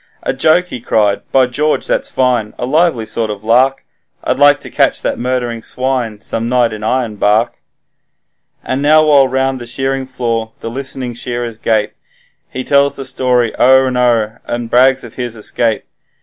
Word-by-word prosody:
'A - - -1
joke!' 160 +6 +2
he 125 - -7
cried, 105 -3 +1
'By 130 -1 +4
George, 150 +5 -1
that's - - -1
fine; 125 -5 0
a - - -3
lively 150 -4 +1
sort 110 +1 -2
of 105 -1 -6
lark; 130 +4 +2 0.4
I'd - - -1
like 145 0 +5
to - - -8
catch - - +1
that - - -2
murdering 120 -2 -2
swine 125 -4 -2
some 115 +1 -3
night 120 -3 +2
in 105 - -7
Ironbark.' 110 -1 0 1.0
And 130 +1 -2
now 155 +2 +5
while 140 -3 +5
round 130 0 -1
the 120 - -8
shearing 135 +2 -2
floor 115 -3 -3
the 115 - -6
list'ning 130 -1 -5
shearers 120 -1 -5
gape, 110 -2 0 0.6
He 130 - -5
tells 140 +1 +2
the 135 - -7
story 125 -3 +1
o'er 130 +1 +5
and 130 -1 -2
o'er, 115 -3 +1
and 120 -1 -4
brags 130 +2 +4
of 120 - -11
his 120 -2 -4
escape. 110 +1 -1
125 Hz, 175 wpm, -15 LUFS, 115-135 Hz, 1.0 s, like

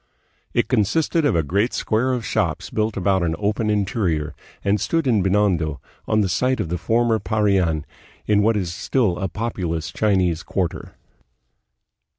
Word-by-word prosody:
It - - +1
consisted 145 - +1
of 145 - +2
a 80 - +2
great 100 - 0
square 120 +4 0
of 125 -3 -2
shops - - -1
built 110 -1 -1
about 95 0 +2
an 80 -2 0
open 105 +2 -1
interior, 95 -7 0 0.3
and 100 0 +1
stood 165 -2 0
in 115 -6 +3
Binondo, 95 -6 +1 0.3
on 110 0 +2
the 100 - +1
site 125 +9 0
of 90 -7 -2
the 90 0 -2
former 115 +4 +2
Parian, 95 -6 +1 0.4
in 105 -1 +3
what 110 +1 +3
is 90 -4 -2
still 95 -1 0
a 95 - -1
populous 85 -5 -3
Chinese 95 -6 +1
quarter. 90 -1 -3
100 Hz, 160 wpm, -22 LUFS, 90-110 Hz, 0.4 s, in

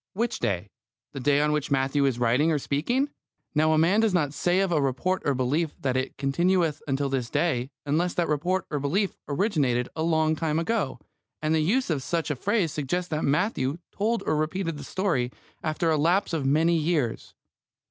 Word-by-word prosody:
Which 230 +4 -1
day? 100 -3 -2 0.4
The - - -6
day 140 +2 +3
on 150 0 +2
which 150 -1 -1
Matthew 135 +1 +2
is 135 -3 +1
writing 125 +7 +2
or 155 - +2
speaking. 240 - 0 0.4
Now, 155 +1 +3
a 155 - +3
man 170 +7 +4
does 220 -4 +2
not 145 -5 +1
say 175 +5 +1
of 195 -2 0
a 155 -3 +2
report 140 +8 0
or 140 - +2
belief 145 +5 -1
that 130 -2 -1
it 130 +1 -2
"continueth 165 +2 +1
until 140 +1 0
this 130 -3 -2
day" 130 -7 0 0.2
unless 165 +5 0
that 175 - +1
report 175 +6 0
or 145 - -1
belief 185 +9 0
originated 140 - +1
a 160 - -3
long 160 -1 +2
time 155 -1 -1
ago, 165 - -1 0.4
and 155 0 0
the 160 - +3
use 205 +8 +1
of 145 -4 0
such 165 +2 -1
a - - -1
phrase 190 - 0
suggests 175 +6 -2
that 155 -1 -2
Matthew 145 - +1
told 225 +3 -1
or 155 - +1
repeated 160 +1 -2
the - - -7
story 145 -8 -1 0.3
after 160 +1 0
a 155 - +2
lapse 175 +5 +2
of 145 -5 0
many 160 +4 +3
years. 155 -7 -1
155 Hz, 200 wpm, -26 LUFS, 140-175 Hz, 0.4 s, man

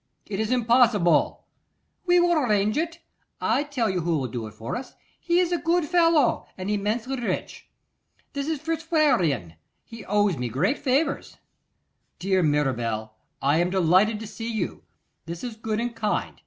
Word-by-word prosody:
'It 200 -1 -4
is 220 0 -1
impossible.' 230 -7 +3 0.6
'We 355 0 +5
will 345 0 +3
arrange 215 -9 +2
it: 335 +2 -2 0.4
I - - +1
tell 285 -6 -1
you 190 -3 0
who 165 -1 0
will 135 -3 -2
do 115 -1 -5
it 105 - -12
for 110 +2 -5
us. 260 - -7 0.2
He 345 0 +1
is 360 -1 +1
a 350 - +1
good 340 0 +1
fellow, 330 -5 +3
and 190 +2 -3
immensely 220 +6 -1
rich: 235 - -4 0.6
it 280 0 -3
is 315 -2 -1
Fitzwarrene; 275 - +1 0.3
he 230 -1 -11
owes 205 -4 +2
me 125 -1 -3
great 180 - 0
favours.' 280 +3 0 0.8
'Dear 190 0 +1
Mirabel, 120 -8 0 0.3
I 145 +4 +3
am 175 +1 +2
delighted 190 +4 +3
to - - -5
see 225 +2 -6
you. 215 -5 -3 0.5
This 170 0 -6
is 240 -3 -5
good 220 -1 -3
and 235 0 -3
kind. 215 -2 -1
220 Hz, 165 wpm, -25 LUFS, 175-280 Hz, 0.8 s, We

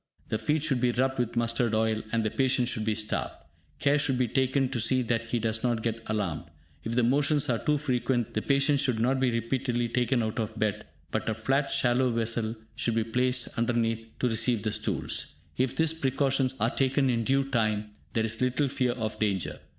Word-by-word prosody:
The 110 - -1
feet 150 0 0
should 135 -6 +1
be 125 -1 +3
rubbed 130 +2 0
with 120 -1 -1
mustard 115 -1 +1
oil, 110 0 +1
and 115 -1 +1
the 110 - -1
patient 130 -2 +2
should 110 -3 -2
be 110 -1 +1
starved. 105 0 -2 0.4
Care 145 +1 +2
should 135 -3 +1
be 125 -1 +2
taken 130 +3 +1
to 130 -2 -2
see 125 +3 +2
that 115 -1 -1
he 120 - -1
does 110 -1 -1
not 120 -3 0
get 115 -1 -2
alarmed. 100 -8 -2 0.4
If 115 +1 -3
the 125 - +3
motions 140 +4 +2
are 115 - 0
too 150 0 +1
frequent, 125 -4 -1
the 110 - 0
patient 140 +2 +2
should 125 -5 +1
not 130 +3 +2
be 130 -1 +2
repeatedly 120 +1 -1
taken 125 0 +1
out 110 +1 -3
of 110 0 -3
bed, 105 0 -1 0.2
but - - -1
a 110 - -1
flat 135 +5 0
shallow 125 +1 +2
vessel 115 -1 -1 0.2
should 115 - 0
be 115 - +2
placed 125 +2 0
underneath 115 -1 0
to 125 - +1
receive 115 -1 +1
the 110 - 0
stools. 75 - -2 0.2
If 130 0 0
these 160 -1 +2
precautions 135 -3 +1
are 115 +3 +2
taken 135 +1 +1
in 115 -1 0
due 135 +4 +2
time, 110 -5 -1 0.2
there 110 -1 +1
is 115 +1 -1
little 130 +3 +1
fear 125 -2 0
of 110 -3 -4
danger. 100 -5 -1
120 Hz, 210 wpm, -28 LUFS, 110-130 Hz, 0.4 s, be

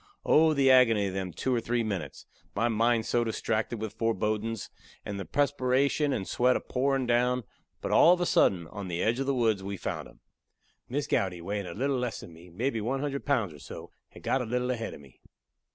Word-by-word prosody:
Oh, 155 0 +5
the 135 -1 +5
agony 115 -5 +5
of 95 - -3
them 95 -1 -3
two 130 +10 -2
or 120 - +1
three 120 +1 0
minutes! 105 -4 -5 0.3
my 115 +3 +2
mind 115 0 +2
so 120 - +1
distracted 110 0 -2
with 110 -1 -4
fourbodin's, 110 0 -2 0.3
and 100 -1 -4
the 95 - -5
presperation 140 - +1
and 100 -8 -2
sweat 125 +1 +2
a - - +1
pourin' 135 0 0
down. 125 +1 +2 0.4
But - - -3
all 170 - +7
of 180 - +3
a 175 - +1
sudden, 90 - +3
on 100 -2 -7
the 85 0 -2
edge 115 +3 +1
of 135 - -2
the 140 - +1
woods, 110 -5 +2
we 100 +1 -5
found - - -4
him. - - -20 0.7
Miss 140 +3 -1
Gowdy, 90 -3 0
weighin' 100 +2 -4
a 85 - -7
little 135 +4 0
less 125 -2 -3
than 85 - -11
me, 85 +2 -14
mebby 115 +6 -2
one 130 +5 -1
hundred 140 -1 -3
pounds 115 - +1
or 75 - -13
so, - - -10 0.2
had - - -15
got 130 - +1
a - - -3
little 125 +2 -1
ahead 115 -2 -4
of - - -13
me. 70 -3 -19
115 Hz, 220 wpm, -28 LUFS, 100-130 Hz, 0.7 s, all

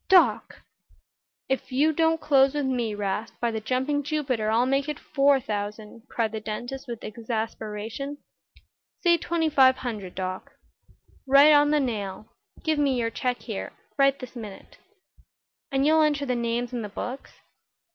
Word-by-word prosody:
"Doc!" 325 - +4 0.8
"If 265 0 -2
you 295 +5 +3
don't 325 +1 +2
close 275 -2 +4
with 290 -2 0
me, 240 -5 -1
'Rast, 205 +2 -3
by 235 -1 0
the 220 - -2
jumping 265 +6 0
Jupiter, 270 -7 -1
I'll 230 +3 +3
make 275 +2 0
it 300 - -3
four 280 -2 +3
thousand," 210 +1 -5
cried 225 -2 -1
the 220 - -4
dentist, 240 +6 -6
with 235 -2 -6
exasperation. 225 +3 -4 0.9
"Say 345 -2 +5
twenty 330 -1 0
five 265 -3 +5
hundred, 210 -8 -5
Doc." 185 0 -5 0.7
"Right 280 +3 +7
on 290 0 +5
the 300 0 +3
nail. 210 -7 -3 0.4
Give 315 -2 +1
me 275 -3 +2
your 230 -1 -1
check 250 +1 -2
here 215 -5 -5 0.4
this 255 -1 -10
minute." 210 -5 -10 0.9
"And 270 0 +2
you'll 315 +1 +5
enter 295 -2 +2
the 255 - 0
names 235 +1 -2
in 240 - -2
the 210 - -5
books?" 250 +6 -6
255 Hz, 155 wpm, -26 LUFS, 220-285 Hz, 0.9 s, Right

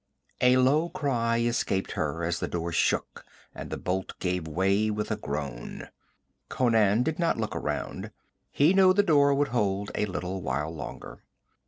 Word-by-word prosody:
A 125 0 +5
low 145 +6 +3
cry 125 -9 0
escaped 115 -5 0
her 80 +2 -2
as 85 0 -1
the - - -2
door 85 0 -3
shook - - 0 0.3
and - - -8
a - - -3
bolt 95 +1 -3
gave 90 -3 -2
way 95 +6 +1
with 105 +1 -3
a - - +1
groan. 70 - -6 0.6
Conan 115 -3 +3
did 160 +3 -2
not 170 -1 +1
look 110 -1 -3
around. - - -4 0.4
He 150 +6 +3
knew 190 -1 +6
the 205 - +4
door 145 -6 +4
would 145 0 +1
hold 100 -4 -1
a 105 - -1
little 95 0 -4
while 75 +2 -2
longer. 80 - -8
105 Hz, 165 wpm, -27 LUFS, 90-135 Hz, 0.6 s, knew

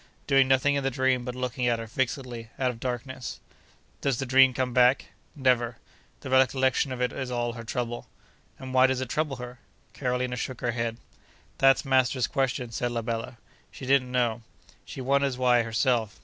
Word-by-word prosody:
Doing 135 -1 +4
nothing 135 +2 +3
in 140 -1 0
the 135 - +1
dream 130 -1 +1
but 125 0 -5
looking 125 0 -2
at 120 -1 +2
her 115 - -6
fixedly, 120 -1 -3
out 130 -1 +1
of 115 - -12
darkness.' 125 +1 -5 0.6
'Does 135 -4 0
the 135 - -2
dream 130 +1 +6
come 125 0 -2
back?' 125 +1 +4 0.3
'Never. 125 -4 +1 0.4
The 130 - -7
recollection 130 +1 +3
of 130 - -4
it 125 - -1
is 130 -2 -4
all 120 -1 -1
her 115 -1 -8
trouble.' 120 +1 -4 0.5
'And 130 0 -8
why 130 0 +6
does 130 -1 0
it 130 -2 -4
trouble 150 -1 -1
her?' 125 0 -9 0.3
Carolina 125 -1 -2
shook 130 0 -5
her 120 - 0
head. 115 -1 -2 0.6
'That's 135 +1 +5
master's 130 -1 +2
question,' 125 -3 -1
said 120 +2 -2
la 115 -1 -2
bella. 115 +1 -4 0.3
'She 130 - -10
don't 130 -1 +2
know. 120 -2 0 0.4
She 135 - -7
wonders 140 0 +1
why, 125 -1 +4
herself. 115 -1 0
125 Hz, 185 wpm, -27 LUFS, 120-130 Hz, 0.6 s, dream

